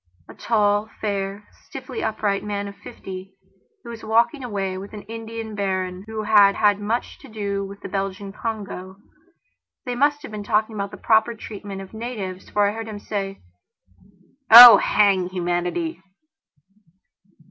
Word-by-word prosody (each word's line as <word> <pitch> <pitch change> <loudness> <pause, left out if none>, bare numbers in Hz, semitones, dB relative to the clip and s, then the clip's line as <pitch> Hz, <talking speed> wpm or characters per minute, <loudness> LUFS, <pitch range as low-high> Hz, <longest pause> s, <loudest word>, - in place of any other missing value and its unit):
A - - -12
tall, 210 -1 +1
fair, 200 0 -3 0.2
stiffly 445 - -7
upright 205 -2 -1
man 205 -1 -4
of 200 - -9
fifty, 190 -2 -10 0.5
he - - -13
was 230 -1 -9
walking 235 +5 +1
away 195 -5 -3
with 195 +3 -9
an 210 -1 -8
Italian 225 0 -7
baron 190 -2 -3
who 220 -1 -5
had 205 -2 +5
had 205 -1 +3
much 220 +4 -3
to 275 - -14
do 200 -3 -3
with 200 0 -9
the - - -6
Belgian 195 0 -4
Congo. 200 -4 -6 0.9
They 250 - -3
must 290 +3 +1
have - - -9
been 210 -1 -6
talking 215 +1 0
about 200 -1 -4
the - - -11
proper 225 +1 +2
treatment 200 -2 -8
of 195 - -12
natives, 215 -5 -6
for 205 -1 +2
I 205 - -1
heard 225 0 -6
him 215 -2 -7
say: 195 -1 -5 1.1
"Oh, 235 +1 +12
hang 195 -3 +2
humanity!" 180 - -2
205 Hz, 155 wpm, -22 LUFS, 195-220 Hz, 1.1 s, Oh